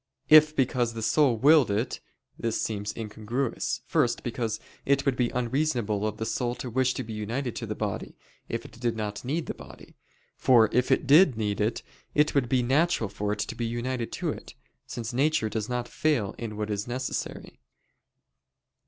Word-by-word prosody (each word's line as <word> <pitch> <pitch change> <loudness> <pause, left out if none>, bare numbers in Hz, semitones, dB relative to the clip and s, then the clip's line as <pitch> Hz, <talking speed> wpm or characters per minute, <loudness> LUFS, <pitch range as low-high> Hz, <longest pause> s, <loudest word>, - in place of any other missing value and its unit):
If 155 0 +8
because 125 -3 +1
the 115 - -4
soul 135 -2 +3
willed 145 +1 +6
it 105 +5 -1 0.4
this 115 -1 -2
seems 105 -1 -2
incongruous. 115 +3 -3
First, 125 -7 +1
because 115 -2 -2 0.2
it 140 0 +2
would 135 -2 +2
be 125 -1 +1
unreasonable 120 -5 0
of 110 0 -4
the 110 - -3
soul 120 +1 -1
to 125 0 -6
wish 130 +1 +1
to - - -3
be 110 - -7
united 115 +4 -3
to - - -4
the - - -3
body, - - -4 0.3
if - - -3
it - - -11
did 120 -2 0
not 105 -1 -4
need 155 +6 -2
the - - -4
body: - - -14 0.4
for 115 -4 +5
if 125 +2 +2
it 130 - +2
did 150 - +6
need 105 -2 -1
it, 110 +3 0 0.3
it 150 +1 +3
would 135 -4 +1
be 125 -1 +2
natural 135 - +2
for 105 +1 -3
it 105 - -3
to - - -3
be 120 - -3
united 120 +1 -3
to - - -2
it, - - -9 0.3
since 120 0 -5
"nature 135 -3 +2
does 110 0 -3
not 125 -1 -2
fail 130 -11 0
in 110 -3 -5
what 105 0 -2
is 105 +2 -2
necessary." 130 - -4
120 Hz, 190 wpm, -27 LUFS, 110-135 Hz, 0.4 s, If